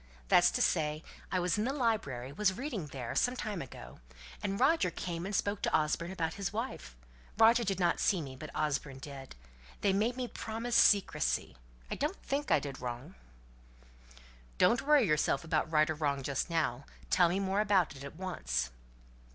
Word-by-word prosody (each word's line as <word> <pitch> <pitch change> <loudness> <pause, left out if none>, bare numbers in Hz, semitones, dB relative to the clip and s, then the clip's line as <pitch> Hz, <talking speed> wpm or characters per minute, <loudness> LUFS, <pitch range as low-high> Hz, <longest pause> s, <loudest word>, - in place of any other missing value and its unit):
That's - - +6
to - - +2
say, 155 0 0 0.3
I 185 - +1
was 180 +3 0
in - - +1
the 255 - 0
library 145 - -1
was 200 0 +2
reading 240 - -4
there, 130 -4 -5
some 250 0 +1
time 210 -7 -4
ago; 130 - -10 0.4
and 200 -1 -2
Roger 270 - +3
came 175 +1 -4
and 200 - -3
spoke 200 +1 0
to - - +1
Osborne 155 +2 -1
about 165 -4 -2
his 200 -2 -3
wife. 220 - -5 0.4
Roger 230 +2 +6
did 195 -3 -1
not 175 -2 +2
see 190 - +2
me, 135 -4 -6
but 150 +3 -8
Osborne 140 -2 -1
did. 135 - -9 0.5
They 195 - +3
made 225 +5 +1
me 250 -1 -2
promise 230 +1 -4
secrecy. 65 - +3 0.4
I - - -2
don't 300 +7 -1
think 285 +2 -2
I - - +5
did 140 -3 -7
wrong." 125 +7 -6 1.4
"Don't 235 - +4
worry 290 -3 +4
yourself 150 -4 +1
about 160 0 0
right 155 -1 +4
or 155 - 0
wrong 145 -3 -1
just 140 +5 -2
now; 140 -6 -1 0.3
tell 175 -2 +5
me 185 +3 0
more 195 +1 +1
about 195 -7 +2
it, 135 - -10
at 140 +2 -8
once." 65 - -2
175 Hz, 185 wpm, -32 LUFS, 145-210 Hz, 1.4 s, That's